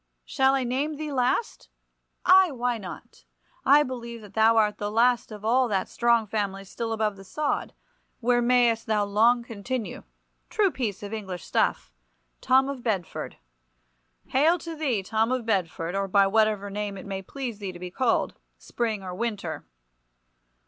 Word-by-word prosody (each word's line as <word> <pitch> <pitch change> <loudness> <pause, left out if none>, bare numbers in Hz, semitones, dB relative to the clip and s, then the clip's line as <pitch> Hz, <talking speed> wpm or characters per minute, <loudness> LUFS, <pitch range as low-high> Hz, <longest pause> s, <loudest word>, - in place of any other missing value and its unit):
shall 265 0 +2
I 265 - 0
name 270 +5 -1
thee 305 0 -5
last? 260 - -1 0.6
Ay, 375 0 +7
why 245 -4 -1
not? 190 -3 -10 0.4
I 290 +2 +6
believe 235 -3 -6
that 205 -2 -13
thou 225 +1 +4
art 210 -1 +2
the 205 - -2
last 235 +2 +2
of 210 0 -8
all 250 +3 +3
that 195 -4 -1
strong 235 -2 +2
family 200 -2 -2
still 225 +4 -5
above 215 -2 -1
the 195 - -11
sod, 290 +10 -2 0.4
where 245 0 +2
mayst 240 -2 +3
thou 210 -2 +2
long 230 +4 +3
continue—true 250 - -4
piece 215 -9 -3
of 205 +1 -6
English 190 -5 -5
stuff—Tom - - 0
of 275 -2 -5
Bedford. 200 -8 -3 0.9
Hail 310 +7 +4
to 330 -1 -7
thee, 265 -10 -1
Tom 220 +4 0
of 255 -3 -1
Bedford, 175 -5 -1
or 195 0 -1
by 195 +1 +4
whatever 210 0 +1
name 205 -1 -4
it 190 - -9
may 195 -1 -4
please 240 +1 -6
thee 200 -2 -4
to 180 - -10
be 180 0 -7
called, 245 +4 +1 0.2
Spring 220 -4 -3
or 180 -1 -6
Winter! 195 - -4
225 Hz, 160 wpm, -26 LUFS, 200-250 Hz, 0.9 s, Ay